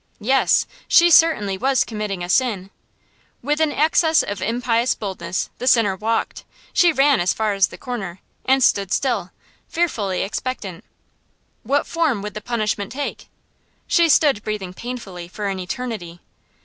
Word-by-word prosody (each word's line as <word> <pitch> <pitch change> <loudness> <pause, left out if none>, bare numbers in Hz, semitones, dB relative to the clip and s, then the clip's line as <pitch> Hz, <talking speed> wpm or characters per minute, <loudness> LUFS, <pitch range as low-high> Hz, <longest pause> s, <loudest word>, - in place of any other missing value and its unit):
Yes, 260 +5 +2 0.2
she 345 0 +5
certainly 210 - +4
was 265 +1 +2
committing 210 -5 -4
a - - -4
sin. 200 -4 0 0.7
With 295 +3 0
an 315 -2 +2
access 315 +2 +3
of 205 -2 -5
impious 235 +3 0
boldness, 185 -4 -4
the 250 - -4
sinner 225 -6 +4
walked 225 +4 -2 0.3
she 350 -1 +5
ran 280 -3 +3
as 175 +1 +1
far 215 -2 0
as 195 -1 +3
the - - -12
corner, 195 -8 -6 0.2
and 265 0 +3
stood 200 -4 +2
still, 210 -9 0 0.4
fearfully 215 - -1
expectant. 200 -4 -5 0.8
What 275 +5 0
form 310 -11 0
would 210 -1 -5
the 215 - -6
punishment 215 -3 -2
take? 285 +2 -5 0.6
She 340 -1 +3
stood 285 -8 +4
breathing 205 -4 -5
painfully 195 -7 -7
for 205 +4 -6
an 190 -1 -3
eternity. 185 -3 -5
220 Hz, 150 wpm, -21 LUFS, 195-265 Hz, 0.8 s, she